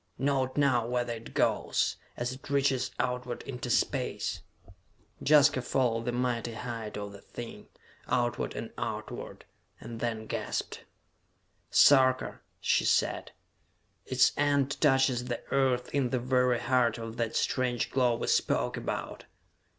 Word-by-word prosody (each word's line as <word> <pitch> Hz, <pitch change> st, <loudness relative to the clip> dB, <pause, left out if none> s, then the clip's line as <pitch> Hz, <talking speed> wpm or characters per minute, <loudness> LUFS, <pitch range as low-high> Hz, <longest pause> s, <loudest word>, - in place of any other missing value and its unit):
"Note 135 Hz, -1 st, 0 dB
now 130 Hz, -5 st, +3 dB
whether 120 Hz, -1 st, -1 dB
it 115 Hz, 0 st, -10 dB
goes, -, -, +1 dB, 0.2 s
as 120 Hz, +1 st, -2 dB
it 135 Hz, +2 st, -12 dB
reaches 135 Hz, -2 st, +1 dB
outward 125 Hz, -1 st, -2 dB
into 125 Hz, -2 st, -6 dB
Space!" -, -, 0 dB, 0.8 s
Jaska 145 Hz, -2 st, +5 dB
followed 120 Hz, -3 st, 0 dB
the 120 Hz, -, 0 dB
mighty 120 Hz, -1 st, -1 dB
height 115 Hz, -3 st, -5 dB
of 100 Hz, -1 st, -5 dB
the 100 Hz, 0 st, -12 dB
thing, 120 Hz, -1 st, -9 dB, 0.4 s
outward 120 Hz, -1 st, 0 dB
and -, -, -5 dB
outward, -, -, -5 dB, 0.3 s
and 115 Hz, -1 st, -8 dB
then 115 Hz, -2 st, -2 dB
gasped. -, -, -4 dB, 0.8 s
"Sarka," 130 Hz, -2 st, +5 dB, 0.2 s
she -, -, +2 dB
said, -, -, +1 dB, 0.8 s
"its 130 Hz, 0 st, +4 dB
end 145 Hz, -1 st, +1 dB
touches 135 Hz, -4 st, +3 dB
the 120 Hz, -1 st, -4 dB
Earth 130 Hz, -2 st, +1 dB
in 140 Hz, -3 st, +1 dB
the 130 Hz, -, 0 dB
very 125 Hz, 0 st, +2 dB
heart 125 Hz, -3 st, +2 dB
of 115 Hz, 0 st, -7 dB
that 115 Hz, -1 st, -2 dB
strange 125 Hz, -2 st, 0 dB
glow 125 Hz, -3 st, +2 dB
we -, -, -3 dB
spoke -, -, +1 dB
about!" -, -, -4 dB
125 Hz, 135 wpm, -29 LUFS, 120-130 Hz, 0.8 s, Jaska